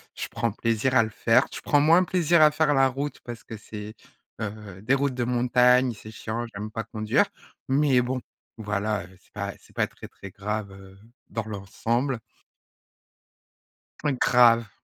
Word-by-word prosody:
je - - -4
prends 115 - -2
plaisir 115 +4 0
à 120 - +7
le 110 - -1
faire, - - +3
je - - -6
prends 145 - +3
moins 165 +5 +5
plaisir 170 -3 +3
à 150 - +7
faire 150 -1 +2
la 135 0 +4
route 140 +3 -4
parce 120 -1 -9
que 115 - -8
c'est, 105 0 -9 0.4
heu, 105 -3 -7
des 125 +5 +2
routes 140 -1 +1
de 125 - -1
montagne, 125 +1 +3
c'est 110 0 -11
chiant, 110 +2 -4
j'aime 105 +2 -5
pas 115 +1 -4
conduire, 110 -1 +1 0.4
mais 135 -2 +3
bon, 125 +1 -2 0.4
voilà, 105 -1 -2
heu, - - -16
c'est - - -30
pas - - -4
c'est - - -22
pas - - +1
très - - -12
très 100 - -11
grave, 105 +2 -4
heu, 95 0 -14 0.3
dans 110 - -3
l'ensemble. 115 +5 -2 2.0
Grave! 115 -2 +5
115 Hz, 170 wpm, -25 LUFS, 105-130 Hz, 2.0 s, à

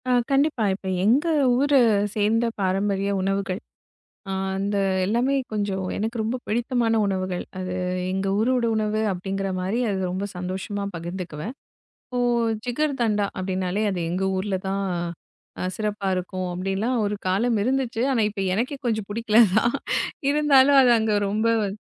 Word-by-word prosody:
அ - - +3 0.2
கண்டிப்பா. 275 -3 +2
இப்ப 190 0 -7 0.2
எங்க 250 - +3 0.3
ஊரு 285 +1 +3 0.4
சேர்ந்த 220 +2 +2
பாரம்பரிய 195 +1 0
உணவுகள், 195 0 -1 0.7
அ - - -2 0.2
அந்த 200 +1 -1 0.3
எல்லாமே 240 +7 +1 0.2
கொஞ்சம் 200 -3 -1
எனக்கு 225 +3 -2
ரொம்ப 225 +4 -1
பிடித்தமான 230 0 +1
உணவுகள். 185 -2 -2
அது 185 -1 -4 0.4
எங்க 190 +1 -1
ஊரோட 245 +2 +2
உணவு 215 0 0
அப்டிங்கற 195 +1 -3
மாரி 190 +6 -1
அது 195 - -1
ரொம்ப 190 +2 -2
சந்தோஷமா 190 +3 -4
பகிர்ந்துக்குவேன். 175 - -6 0.5
இப்போ 250 -1 -3 0.5
ஜிகர்தண்டா 240 -6 0
அப்டின்னாலே 185 +2 -1
அது 185 -2 -3
எங்க 185 +2 -1
ஊர்ல 195 +1 -2
தான் 195 +1 -1 0.8
அ - - -2
சிறப்பா 210 -2 -2
இருக்கும் 185 0 -3
அப்டிலாம் 195 +7 -1
ஒரு 205 0 -1
காலம் 225 +5 +2
இருந்துச்சு. 250 -1 0
ஆனா, 255 -4 +2
இப்ப 205 -1 -6
எனக்கே 245 +7 -1
கொஞ்சம் 220 -4 -1
புடிக்கல 220 +1 +1 0.2
தான். 235 +3 +3 0.6
இருந்தாலும் 285 -2 +5
அது 250 - +5
அங்க 220 -1 +1
ரொம்ப 215 +3 +1
வந் 200 -1 -2
210 Hz, 140 wpm, -24 LUFS, 190-235 Hz, 0.8 s, இருந்தாலும்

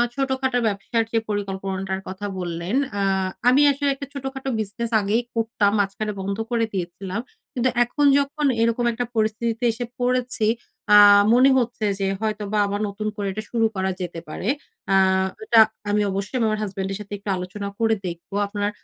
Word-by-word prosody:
ছোটখাটো 265 -2 0
ব্যবসার 215 +3 0
যে 230 - +1
পরিকল্পনাটার 195 -1 -3
কথা 190 +2 -6
বললেন। 175 +3 -3 0.2
অ্যা 200 -1 0 0.4
আমি 255 +3 +6
আসলে 280 +1 0
একটা 280 0 -7
ছোটখাটো 270 -1 -5
বিজনেস 220 +3 -3
আগেই 205 +4 +1
করতাম। 225 -3 +1
মাঝখানে 205 +2 -1
বন্ধ 195 +1 -3
করে 230 -1 +2
দিয়েছিলাম। 185 +2 -4 0.3
কিন্তু 255 -1 +1
এখন 290 +5 0
যখন 285 +2 -1 0.2
এরকম 230 +1 +1
একটা 245 +2 -2
পরিস্থিতিতে 225 +2 -1
এসে 235 +2 -4
পড়েছি 245 -2 +1 0.4
অ্যা 210 0 +9 0.3
মনে 255 +3 +6
হচ্ছে 240 -3 -1
যে, 195 - 0
হয়তোবা 215 -1 -2
আবার 200 +1 -2
নতুন 210 +2 -4
করে 205 -2 -3
এটা 215 +3 -5
শুরু 230 -1 +2
করা 190 0 0
যেতে 175 -2 -4
পারে। 185 - -5 0.4
অ্যা 195 - +4 0.5
এটা 230 +1 +5 0.3
আমি 210 +1 +2
অবশ্যই 195 +5 -3
আমি 230 - +2
আমার 215 0 -1
হাসব্যান্ডের 195 -1 -3
সাথে 205 0 -8
একটু 200 +1 -7
আলোচনা 185 +3 -5
করে 225 -1 +3
দেখব। 170 +1 -8 0.2
আপনার 205 0 -2
215 Hz, 165 wpm, -23 LUFS, 195-240 Hz, 0.5 s, অ্যা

